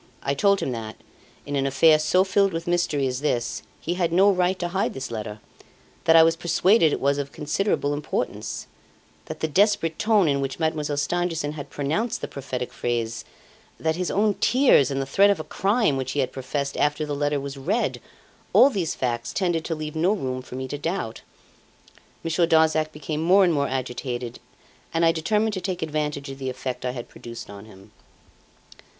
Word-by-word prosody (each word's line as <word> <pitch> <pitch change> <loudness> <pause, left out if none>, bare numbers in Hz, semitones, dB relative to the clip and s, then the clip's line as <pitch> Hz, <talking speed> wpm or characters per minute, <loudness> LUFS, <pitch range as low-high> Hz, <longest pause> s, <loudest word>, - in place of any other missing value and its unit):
I 140 - 0
told 200 +7 +3
him - - -2
that 110 -2 -5 0.5
in 145 - -3
an 135 -1 +1
affair 155 +3 +5
so 180 +4 +3
filled 195 0 +2
with 165 0 -3
mystery 175 -5 +1
as 130 0 -2
this, 120 -5 -1 0.2
he 170 - -2
had 175 -2 0
no 195 +4 +5
right 180 0 +1
to 175 -1 -3
hide 190 +3 -1
this 130 -2 -5
letter; 110 -1 -5 0.7
that 165 - +6
I 165 - +9
was 165 0 +3
persuaded 170 +1 +3
it - - -1
was 140 +1 +1
of 140 0 -4
considerable 150 0 -1
importance; 145 0 -3 0.6
that - - -8
the 160 - +1
desperate 185 -1 +2
tone 215 -4 +3
in 140 -1 +1
which 135 -1 -3
Mademoiselle 155 -3 -1
Stangerson 165 0 -1
had 150 -2 -8
pronounced 160 +12 -1
the - - -3
prophetic 130 -2 -5
phrase, 115 -1 -2 0.5
that 160 0 0
his 180 +1 -2
own 210 +1 +2
tears, 245 - +4
and 135 -1 -2
the 135 - -1
threat 195 +9 +4
of 200 - +2
a - - -3
crime 195 - +1
which 130 0 -3
he 145 - -1
had 130 - -2
professed 140 +1 -3
after 150 +1 +1
the 145 - -3
letter 145 0 0
was 140 0 -6
read 135 -1 -1 0.5
all 245 +8 +7
these 185 - -2
facts 120 -2 -2
tended 175 -4 0
to 165 - -2
leave 155 0 -6
no 175 +6 +2
room 130 -10 -3
for 125 - -10
me 130 0 -4
to 145 +2 -5
doubt. 165 -8 -3 1.0
Monsieur 165 +1 +1
Darzac 160 -1 +3
became 150 +1 -4
more 185 +4 +5
and 175 -2 +3
more 140 -2 +1
agitated, 125 -2 -4 0.6
and 165 +1 +3
I 165 - +6
determined 210 +7 0
to 185 - -3
take 180 -2 -3
advantage 150 -2 -3
of 135 - -9
the 130 -1 -3
effect 130 0 -5
I 125 - 0
had 120 -2 -7
produced 115 -2 -10
on 100 +1 -10
him. 95 -3 -16
155 Hz, 195 wpm, -24 LUFS, 135-175 Hz, 1.0 s, I